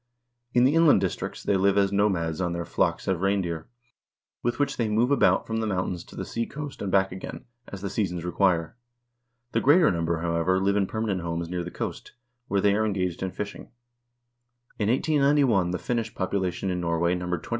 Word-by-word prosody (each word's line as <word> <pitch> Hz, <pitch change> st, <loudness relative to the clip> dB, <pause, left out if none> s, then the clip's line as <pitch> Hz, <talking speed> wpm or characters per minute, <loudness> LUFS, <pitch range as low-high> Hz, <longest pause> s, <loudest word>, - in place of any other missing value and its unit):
In 120 Hz, -, +5 dB
the 135 Hz, +3 st, +4 dB
inland 165 Hz, -8 st, +6 dB
districts 95 Hz, -2 st, -3 dB
they 100 Hz, -, +2 dB
live 100 Hz, +1 st, +3 dB
as 100 Hz, -1 st, +3 dB
nomads 95 Hz, -5 st, +1 dB
on 90 Hz, -1 st, -1 dB
their 85 Hz, 0 st, -3 dB
flocks -, -, 0 dB
of 95 Hz, -2 st, 0 dB
reindeer, 95 Hz, -5 st, -1 dB, 0.7 s
with 120 Hz, -, -1 dB
which 140 Hz, -1 st, 0 dB
they 115 Hz, -3 st, 0 dB
move 115 Hz, +5 st, +2 dB
about 140 Hz, -, +3 dB
from 110 Hz, -, -3 dB
the 110 Hz, -1 st, -1 dB
mountains 90 Hz, -3 st, -2 dB
to -, -, -14 dB
the -, -, -4 dB
seacoast 140 Hz, +5 st, -5 dB
and 100 Hz, -, -2 dB
back 95 Hz, 0 st, +3 dB
again, 95 Hz, +1 st, -8 dB, 0.2 s
as 100 Hz, -, -8 dB
the 100 Hz, -, -3 dB
seasons 90 Hz, -5 st, -2 dB
require. 90 Hz, 0 st, +1 dB, 0.8 s
The -, -, +1 dB
greater 150 Hz, -, +5 dB
number, 85 Hz, -1 st, -1 dB
however, 85 Hz, +2 st, +1 dB
live 100 Hz, +1 st, +1 dB
in 100 Hz, -2 st, +2 dB
permanent 110 Hz, -4 st, -2 dB
homes 85 Hz, 0 st, -3 dB
near 90 Hz, 0 st, -2 dB
the 85 Hz, -, -6 dB
coast, -, -, -6 dB, 0.3 s
where 100 Hz, 0 st, +1 dB
they 100 Hz, 0 st, +4 dB
are 110 Hz, +2 st, +1 dB
engaged 90 Hz, -5 st, -1 dB
in 95 Hz, -, -1 dB
fishing. 100 Hz, +2 st, -7 dB, 1.1 s
In 105 Hz, -1 st, +1 dB
1891 140 Hz, -, +3 dB
the 90 Hz, -, -1 dB
Finnish 115 Hz, +2 st, -3 dB
population 95 Hz, -1 st, -1 dB
in 90 Hz, -1 st, -2 dB
Norway 85 Hz, 0 st, +1 dB
numbered 90 Hz, -1 st, -3 dB
20,780. -, -, -11 dB
95 Hz, 195 wpm, -26 LUFS, 90-110 Hz, 1.1 s, inland